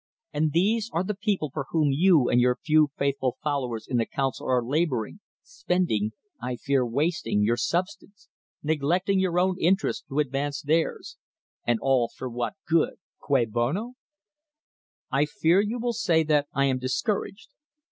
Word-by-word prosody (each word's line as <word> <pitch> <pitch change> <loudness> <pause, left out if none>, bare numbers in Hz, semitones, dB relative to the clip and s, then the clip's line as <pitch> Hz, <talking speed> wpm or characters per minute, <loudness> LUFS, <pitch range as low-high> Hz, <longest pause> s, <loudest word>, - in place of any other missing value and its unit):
And 155 +1 +1
these 210 +7 +1
are 170 - +1
the 210 - -2
people 200 - -1
for 140 -3 -4
whom 155 -3 +2
you 155 -2 +4
and 120 - +3
your 125 0 +3
few 155 +1 +3
faithful 140 -2 -1
followers 130 -7 -2
in 125 - 0
the 115 - +1
Council 135 -1 -2
are 125 -2 +1
labouring, 140 - -1 0.2
spending 180 - -1 0.3
(I 125 +1 -3
fear 135 +2 +1
wasting) 125 -4 0
your 115 +3 +2
substance 185 - -3 0.2
— - - -51
neglecting 160 +6 +1
your 180 -2 +1
own 185 0 +1
interest 190 +4 +1
to 135 - -5
advance 140 0 -1
theirs, 160 +3 -1 0.5
and 120 -1 +3
all 130 -3 +2
for 130 - -7
what 120 0 -3
good 165 0 +2
— - - -81
" - - -60
cui 135 -4 +2
bono"? 130 - -2 1.2
I 140 +2 +3
fear 165 +5 +2
you 215 +4 -2
will 240 0 -1
say 170 -8 +2
that 150 -2 +2
I 140 - +1
am 130 -2 +1
discouraged. 150 - -2
150 Hz, 165 wpm, -26 LUFS, 130-180 Hz, 1.2 s, you